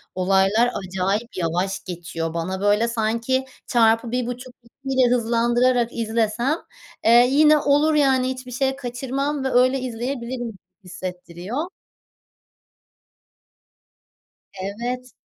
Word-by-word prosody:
olaylar 195 +5 +3
acayip 195 +4 -2
yavaş 180 +3 -1
geçiyor, 165 -2 -5
bana 185 +3 -3
böyle 205 +3 +3
sanki 230 +3 0 0.2
çarpı 230 -1 +3
1,5-2 250 +1 -5
ile 250 -1 +4
hızlandırarak 240 +1 +2
izlesem, 230 +4 0 0.5
eee, 240 +2 +7
yine 300 +2 +5
olur 295 +2 +3
yani 265 -3 +3
hiçbir 255 -1 -6
şey 265 +2 0
kaçırmam 270 +2 -3
ve 265 - -1
öyle 255 +2 +3
izleyebilirim 240 -2 -4 0.3
hissettiriyor. 180 - -6 3.0
Evet, 245 +5 -4
240 Hz, 95 wpm, -22 LUFS, 205-255 Hz, 3.0 s, eee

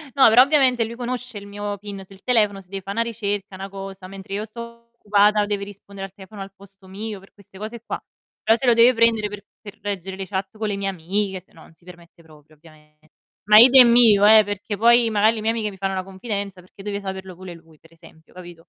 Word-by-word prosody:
No, 265 -4 +6
però 240 +3 +7
ovviamente 265 -5 +2
lui 230 +1 -8
conosce 250 -1 -5
il 200 0 -10
mio 205 0 -5
pin 200 -1 -9
sul 195 0 -18
telefono, 210 -5 +1
se 185 - -24
deve 195 -1 -6
fa' 195 +2 -6
'na 230 - -1
ricerca, 205 -4 -4
'na 195 +1 -7
cosa, 195 -1 -9
mentre 195 0 -10
io 210 +2 -3
sto 235 +1 -12
occupata 210 -1 +2
deve 205 -1 -3
rispondere 200 -1 -10
al 190 - -25
telefono 195 +1 -12
al 195 0 -9
posto 195 -1 -19
mio, 205 +1 -7
per 195 - -20
queste 195 -2 -18
cose 220 +3 -8
qua. - - -5 0.4
Però 225 +1 +3
se 265 - -4
lo 240 - +5
deve 235 +2 +5
prendere 225 -2 +2
per 205 0 -9 0.2
per 205 -3 -12
reggere 195 -2 -5
le 195 - -5
chat 190 +1 -5
con 215 -1 -3
le 205 - -2
mie 195 0 -3
amiche, 190 +2 -3
se - - -33
no 165 - -17
non - - -19
si 170 - -29
permette 170 -1 -16
proprio, 155 -1 -20
ovviame 150 -1 -21 0.5
ma 210 0 +7
idem 245 -1 +8
io, 215 -4 +6
eh, 215 0 +7
perché 205 +1 -5
poi 235 +2 +4
magari 215 +2 +3
le 215 - -5
mie 220 +1 +1
amiche 220 -2 -2
mi 195 - -12
fanno 195 0 -2
una 185 - -3
confidenza, 195 0 -6
perché 185 +2 -17
deve 200 0 -4
saperlo 190 -2 -7
pure 185 -1 -10
lui, 165 -2 -18
per 165 - -22
esempio, 165 -1 -20
capito? 175 -2 -12
200 Hz, 240 wpm, -22 LUFS, 190-220 Hz, 0.5 s, idem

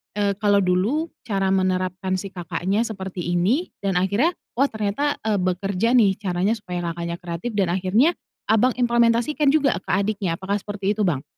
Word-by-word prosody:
eee, 200 -1 +1
kalau 205 -1 +3
dulu 200 - +1
cara 195 -3 -1
menerapkan 185 0 0
si 195 - -5
kakaknya 185 +4 -1
seperti 190 -5 -5
ini 220 - +1
dan 195 -2 -1
akhirnya, 205 - +1 0.2
"Oh 275 - +5
ternyata, 220 +6 -1
eee, 215 -2 +1
bekerja 185 +5 0
nih 200 -6 +4
caranya 190 +1 0
supaya 175 -4 -4
kakaknya 170 0 -4
kreatif," 175 +6 -4
dan 195 -2 +2
akhirnya 190 - +3 0.4
Abang 230 +3 +3
implementasikan 240 +4 +2
juga 275 - +3
ke - - -36
adiknya, 195 -2 0
apakah 195 +3 -2
seperti 205 0 -3
itu, 210 -1 0
Bang? 140 -6 -1
200 Hz, 165 wpm, -23 LUFS, 185-230 Hz, 0.4 s, Oh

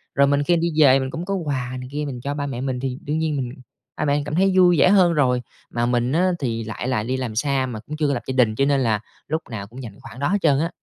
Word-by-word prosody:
Rồi, 140 0 +5
mình 140 0 +2
khi 175 - +2
mình - - -1
đi 155 - +2
về 135 0 +6
mình 130 0 -3
cũng 165 +2 -5
có 195 - -2
quà 130 -7 -3
này 125 0 -8
kia 150 +1 -3
mình 125 -3 -6
cho 140 +2 -3
ba 145 -1 -3
mẹ 125 -2 -4
mình 130 -2 -2
thì 130 -1 -3
đương 150 +2 -2
nhiên 160 -2 0
mình 125 -2 -3 0.5
ba 150 - -1
mẹ 140 - +2
mình 145 - -1
cảm 150 +1 -4
thấy 190 +2 +3
vui 175 -2 +6
vẻ 185 - +6
hơn 185 -4 +5
rồi. 125 -5 +2 0.3
Mà 120 0 -1
mình 120 +1 +1
á, 180 +4 +3
thì 115 -4 -2
lại 110 +3 -5
là 125 -5 0
đi 130 +3 -2
làm 120 -4 -4
xa 135 +1 +1
mà 115 -4 -5
cũng 150 +7 -8
chưa 150 -2 +1
có 140 - +1
lập 125 - -3
gia 130 - -2
đình 115 -4 +3
cho 140 - +2
nên 140 -1 +2
là 110 -5 +1 0.3
lúc 160 +2 -1
nào 100 -3 -6
cũng 125 +4 -10
dành 115 - -7
cái - - -19
khoản 130 -2 -11
đó 140 - 0
hết 200 +3 +2
trơn 145 -4 +3
á. 165 - 0
135 Hz, 325 wpm, -22 LUFS, 125-150 Hz, 0.5 s, về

